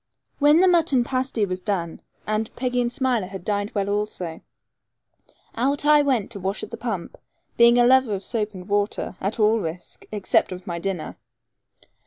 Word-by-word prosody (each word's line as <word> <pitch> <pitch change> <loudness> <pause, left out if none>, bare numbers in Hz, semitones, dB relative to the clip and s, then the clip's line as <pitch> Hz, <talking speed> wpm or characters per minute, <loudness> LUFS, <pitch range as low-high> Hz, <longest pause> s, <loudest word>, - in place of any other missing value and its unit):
When 295 +3 +5
the 375 - +5
mutton 330 -8 +3
pasty 255 -3 -1
was 185 -1 -3
done, 175 -4 -3 0.2
and 215 +1 -1
Peggy 250 -1 0
and 240 0 -1
Smiler 245 -6 0
had 190 -2 -9
dined 205 -1 -1
well 200 -1 0
also, 200 -5 -3 1.1
out 275 +4 0
I 300 0 +6
went 255 -8 0
to 205 - -6
wash 195 +3 -2
at - - -7
the - - -4
pump, 220 -8 -5 0.4
being 235 0 +6
a 240 - +5
lover 255 -4 +4
of 190 - -6
soap 215 -3 -2
and 185 0 -9
water, 205 -1 -1
at 200 +4 -3
all 215 +1 +4
risk, 170 -1 -7
except 205 -3 +1
of 180 0 -7
my 170 -1 -4
dinner. 180 -3 -4
215 Hz, 180 wpm, -23 LUFS, 195-250 Hz, 1.1 s, I